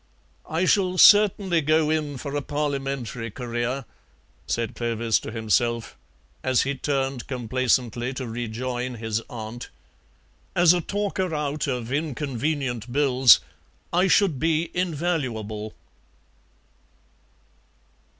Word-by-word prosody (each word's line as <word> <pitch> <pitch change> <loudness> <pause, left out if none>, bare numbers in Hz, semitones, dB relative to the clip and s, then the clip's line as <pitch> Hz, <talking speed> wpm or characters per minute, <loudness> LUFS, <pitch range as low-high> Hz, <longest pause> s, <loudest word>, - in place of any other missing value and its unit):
"I 165 +4 0
shall 185 -2 +2
certainly 195 -4 +6
go 155 +1 +2
in 150 -3 -1
for 140 +2 -5
a 145 - 0
Parliamentary 135 -5 -3
career," 120 +3 -3 0.6
said 115 -1 -1
Clovis 115 -1 0
to - - -7
himself 115 +1 0 0.5
as 130 -1 +2
he 140 - -1
turned 135 -2 -2
complacently 125 -1 0
to 130 - -4
rejoin 120 +2 -4
his 110 -1 -2
aunt. 115 -1 -7 0.9
"As 175 -1 +6
a 175 - 0
talker 190 -2 -2
out 150 0 -2
of 125 -3 -3
inconvenient 140 -4 -2
bills 130 -2 +5 0.5
I 180 +2 +3
should 185 -8 +3
be 165 +2 0
invaluable." 130 - -2
135 Hz, 105 wpm, -24 LUFS, 120-155 Hz, 0.9 s, certainly